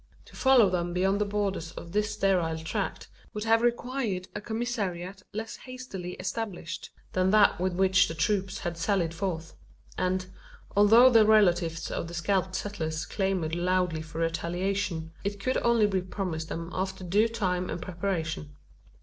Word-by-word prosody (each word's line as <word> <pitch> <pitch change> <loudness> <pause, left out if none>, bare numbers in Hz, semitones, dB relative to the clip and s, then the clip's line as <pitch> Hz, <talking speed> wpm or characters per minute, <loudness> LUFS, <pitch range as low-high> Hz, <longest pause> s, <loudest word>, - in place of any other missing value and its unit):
To - - -16
follow 265 -5 +6
them 175 -1 -1
beyond 190 +3 +1
the - - +3
borders 200 -5 -2
of 170 - -9
this 210 +2 +1
sterile 180 -6 +1
tract 160 0 -3 0.3
would 210 - -2
have 225 +1 +4
required 240 -5 -1
a - - -5
commissariat 205 -5 -3
less 220 +2 -5
hastily 250 -9 -7
established 185 -3 -5 0.2
than 185 0 +2
that 210 -2 +5
with 185 0 +1
which 190 0 +4
the 160 - -5
troops 195 +4 0
had 175 -5 -4
sallied 170 -2 +1
forth; 165 -3 -3 0.5
and, 185 0 0 0.5
although 225 +5 +7
the 225 -2 +7
relatives 175 -6 +3
of - - -3
the 170 - -7
scalped 190 +2 0
settlers 160 -6 -3
clamoured 190 -5 -1
loudly 180 -2 +1
for 160 0 -9
retaliation, 170 0 -1
it 200 0 -3
could 255 +6 0
only 235 -2 +3
be 195 -2 +1
promised 180 -4 -4
them 165 +1 -5
after 190 0 -3
due 205 +5 +3
time 185 -6 -1
and - - -3
preparation. 165 -5 -3
190 Hz, 160 wpm, -28 LUFS, 170-210 Hz, 0.5 s, although